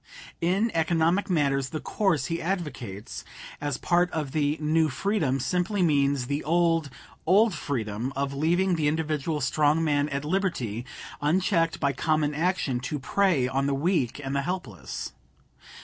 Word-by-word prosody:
In 195 +7 +2
economic 165 +4 +2
matters 140 -6 +1
the 155 - -4
course 170 -6 0
he 165 0 -2
advocates 130 - -4 0.4
as 145 -3 -2
part 175 +1 +2
of 150 -5 -3
the 150 0 +1
"New 155 +1 +2
Freedom" 160 -11 0
simply 180 +7 0
means 140 -4 +2
the 145 +4 -2
old, 165 -1 +2 0.4
old 205 +4 +5
"freedom" 120 -5 -3
of 140 0 -1
leaving 175 +5 +2
the 150 -2 +1
individual 155 0 -1
strong 150 +4 +2
man 145 -1 +1
at 140 0 -3
liberty, 140 - -1 0.3
unchecked 165 +2 +1
by 140 -1 +1
common 155 +2 +1
action, 160 -5 0
to 140 +4 -3
prey 150 -1 +2
on 135 +2 0
the 140 - +1
weak 145 -4 0
and 135 +1 -3
the 140 - +2
helpless. 135 - -5
155 Hz, 150 wpm, -26 LUFS, 140-175 Hz, 0.4 s, old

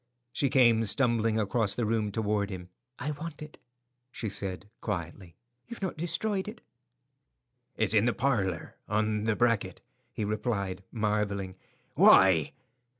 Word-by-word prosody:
She 140 - +1
came 120 -4 +4
stumbling 115 -1 +3
across 110 0 0
the 120 - -1
room 110 -1 0
toward 105 -1 -1
him. 90 -2 -7 0.3
"I 150 - -3
want 150 +1 -7
it," 150 - -12 0.5
she 115 -3 -3
said, 95 0 -2
quietly. 85 -3 -5 0.3
"You've 235 -4 -8
not 190 - -2
destroyed 190 +5 -2
it?" 215 +2 -8 1.2
"It's 110 -1 +2
in 105 0 +4
the 120 - +3
parlour, 100 - -1
on 105 0 0
the 110 -1 +1
bracket," 115 -6 +1 0.3
he 105 - -3
replied, 100 -3 -2
marvelling. 105 -4 -1 0.4
"Why?" 90 -6 +6
110 Hz, 135 wpm, -29 LUFS, 100-120 Hz, 1.2 s, Why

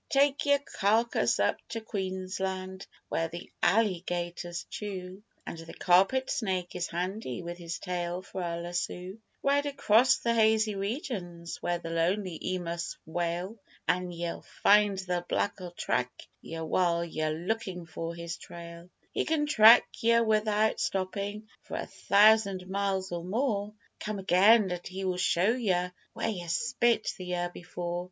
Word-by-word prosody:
Take 280 +1 +3
yer 285 0 +6
karkass 230 -4 +1
up - - +2
to 230 - -3
Queensland 190 -2 -4 0.2
where 165 - 0
the 170 +2 -9
allygators 175 -4 0
chew 190 -2 -6 0.2
And 165 - -6
the 165 0 -10
carpet 195 +9 +3
snake 185 -6 -2
is 180 0 -1
handy 180 - -4
with 175 +1 -6
his 170 -1 -5
tail 180 -1 -3
for 190 -1 -6
a 170 -1 -2
lassoo; 180 +3 -4 0.2
Ride 285 +1 +2
across 260 -3 +4
the 235 - 0
hazy 220 -1 +3
regins 195 - -4
where 175 0 0
the 165 -1 -7
lonely 180 +2 0
emus 170 -1 -4
wail 175 +6 -3 0.3
An' 180 0 +1
ye'll 170 0 -4 0.2
find 205 -1 +6
the 180 -2 -2
black'll 185 -3 -1
track 125 -7 -1 0.3
yer 165 0 -6
while 170 0 +1
yer 155 -2 -2
lookin' 180 +2 -3
for 165 +1 -5
his 170 0 -5
trail; 170 0 -10 0.2
He - - 0
can 310 -2 +1
track 230 -5 +8
yer 230 0 +4
without 215 0 +2
stoppin' 200 +3 -2
for - - -6
a - - -3
thousand 200 -3 +4
miles 190 -1 -1
or 170 -1 -3
more 210 0 -1 0.2
Come 215 -1 -3
again, 195 +2 +5
and 175 0 -4
he 190 +1 -5
will 185 -1 0
show 180 +3 +3
yer 185 -7 0 0.2
where - - -2
yer 180 -5 -4
spit 235 +5 +1
the 185 - -6
year 175 -1 -2
before. 175 0 -4
185 Hz, 150 wpm, -29 LUFS, 175-215 Hz, 0.3 s, track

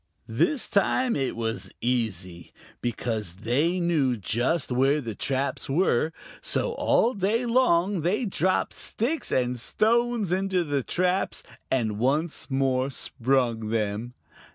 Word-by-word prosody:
This 270 - +1
time 235 +5 +2
it 135 -2 -1
was 115 -1 -3
easy, 95 -8 -2 0.3
because 110 -6 -2
they 155 +10 +2
knew 155 -8 +2
just 120 - 0
where 135 +4 +3
the 115 -6 -5
traps 135 +6 -2
were, 155 -1 +2 0.3
so 485 - 0
all 255 - +2
day 210 +4 0
long 205 -7 +2
they 195 - 0
dropped 185 -2 0
sticks 280 +9 -2
and 125 -1 0
stones 230 - +1
into 190 -1 +1
the 145 -3 -1
traps 180 +7 -1 0.3
and 110 -5 0
once 150 +8 0
more 135 -1 +1
sprung 125 -4 0
them. 110 +2 -2
140 Hz, 125 wpm, -26 LUFS, 120-190 Hz, 0.3 s, where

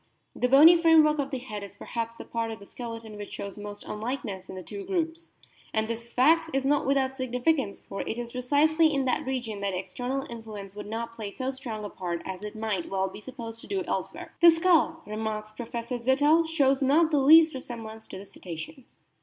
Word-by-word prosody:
The 250 - +1
bony 300 +6 +9
framework 320 -3 +5
of 275 -1 -1
the 270 - -3
head 230 -5 -6
is 200 0 -9
perhaps 230 +2 -4
the - - -9
part 230 -1 -2
of 225 - -5
the 200 - -13
skeleton 230 -2 -7
which 205 0 -8
shows 200 0 -6
most 205 0 -7
unlikeness 210 -4 -4
in - - -7
the 185 - -7
two 400 - -7
groups. 335 -3 -3 0.4
And 220 0 +1
this 230 +1 -5
fact 325 +6 +4
is 270 0 +1
not 285 -1 +2
without 270 -1 +2
significance, 255 -2 0
for 195 - -6
it 225 - -4
is 240 -1 -5
precisely 300 +6 +3
in 275 -2 0
that 255 0 0
region 240 -6 -3
that 200 -2 -1
external 250 +8 -3
influence 215 -4 -8
would 210 0 -7
not 230 +2 -4
play 220 -3 -5
so 260 +6 -3
strong 235 -5 -6
a - - -5
part 170 -2 -4
as 190 +1 -6
it 210 +1 -6
might 215 -5 -2
well 190 0 0
be 205 - -10
supposed 230 -2 -7
to - - -11
do 390 -2 -1
elsewhere. - - -4
" - - -47
The 340 - +10
skull," 325 -1 +3
remarks 215 0 -4
Professor 235 +2 -5
Zittel,* 290 +7 +3
"shows 275 -4 +3
not 310 +5 +4
the 295 - +3
least 315 +3 +7
resemblance 225 -4 -7
to - - -8
the 195 - -9
Cetaceans." 195 - -9
240 Hz, 210 wpm, -27 LUFS, 215-285 Hz, 0.4 s, The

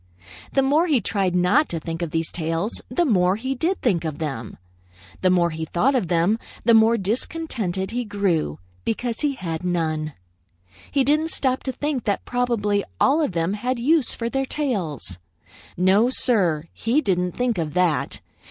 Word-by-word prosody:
The 270 - +3
more 300 +6 +3
he 290 -6 +3
tried 190 -3 0
not 180 +13 +3
to 165 - -2
think 165 +1 -5
of 170 - -2
these 165 +1 -2
tails, 165 +6 -2
the 340 +8 +1
more 185 - +3
he 260 +5 -2
did 335 +8 -1
think 185 -9 +2
of 155 -3 -3
them. 135 -8 -5 0.6
The 185 - +4
more 175 -2 +3
he 160 0 -4
thought 235 - +1
of 245 -9 +1
them, 175 +6 +2 0.3
the 235 - +6
more 225 +1 +6
discontented 210 - -2
he 245 +1 -1
grew 190 - 0 0.3
because 230 0 -2
he 295 -2 +1
had 165 -7 -4
none. 155 -4 -1 0.8
He 275 - +2
didn't 305 +4 +2
stop 260 -4 0
to 265 - 0
think 275 -1 -2
that 205 - -1
probably 230 -5 0 0.2
all 305 +4 +4
of 290 -11 0
them 165 +3 0
had 245 +5 -1
use 280 +3 +2
for 230 - -3
their 270 +2 -1
tails. 180 - -2 0.6
No, 195 +6 +4
Sir, 190 - +1
he 235 +6 +1
didn't 180 - 0
think 245 -6 0
of 155 -2 -3
that. 180 -4 +1
205 Hz, 175 wpm, -23 LUFS, 170-255 Hz, 0.8 s, the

